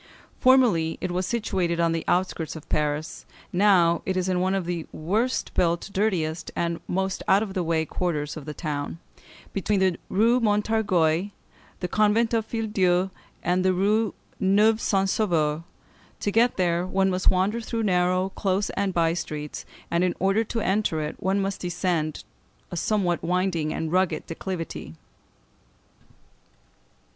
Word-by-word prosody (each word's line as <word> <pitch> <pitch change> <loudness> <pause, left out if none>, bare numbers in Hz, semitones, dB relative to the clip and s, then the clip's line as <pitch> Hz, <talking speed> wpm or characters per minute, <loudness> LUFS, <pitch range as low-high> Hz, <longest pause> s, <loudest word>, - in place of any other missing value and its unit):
Formerly 235 -12 +4
it 185 - -3
was 180 +1 -1
situated 190 -7 -1
on 170 -1 +3
the 165 -1 -1
outskirts 175 -3 0
of 160 - -10
Paris, 150 +3 -1 0.3
now 180 -3 +4
it 190 -1 -1
is 185 0 0
in 185 -1 +1
one 185 +1 +1
of 190 -3 -1
the 170 -2 -3
worst 215 +11 -1
built, 170 +2 0
dirtiest, 175 -5 0
and 170 -1 -1
most 190 +1 -1
out 200 +3 +5
of 200 -3 -6
the 185 - -1
way 160 -1 0
quarters 150 -4 -2
of 155 -3 -8
the 150 - -5
town, 150 -1 -4 0.6
between 200 +1 0
the 185 -3 +1
Rue 230 +5 +3
Montorgueil, 205 -6 +2 0.5
the 180 - -1
convent 215 +4 +2
of 225 -2 +1
the - - -30
Filles 225 -2 -3
Dieu, 185 -1 +2 0.3
and 180 +1 +1
the 185 0 +3
Rue 210 +3 +1 0.2
Neuve 210 +4 +3
Saint 195 -1 +1
Sauveur. 165 -7 +1 0.6
To 205 - 0
get 235 +3 +3
there 175 -1 +1
one 190 +1 +1
must 185 0 +2
wander 195 +5 +1
through 225 0 -3
narrow, 185 -1 +2
close, 195 +1 -1
and 195 -2 -2
by 165 -1 +3
streets; 150 -3 -5 0.2
and 170 +1 +2
in 180 - +1
order 195 +4 +2
to 225 +1 -3
enter 190 -5 0
it, 150 +1 -4
one 190 +2 +1
must 195 0 -2
descend 175 -3 -1 0.5
a - - -4
somewhat 180 -1 0
winding 175 -3 0
and 160 0 -3
rugged 180 -3 +1
declivity. 165 - -5
185 Hz, 160 wpm, -25 LUFS, 170-200 Hz, 0.6 s, out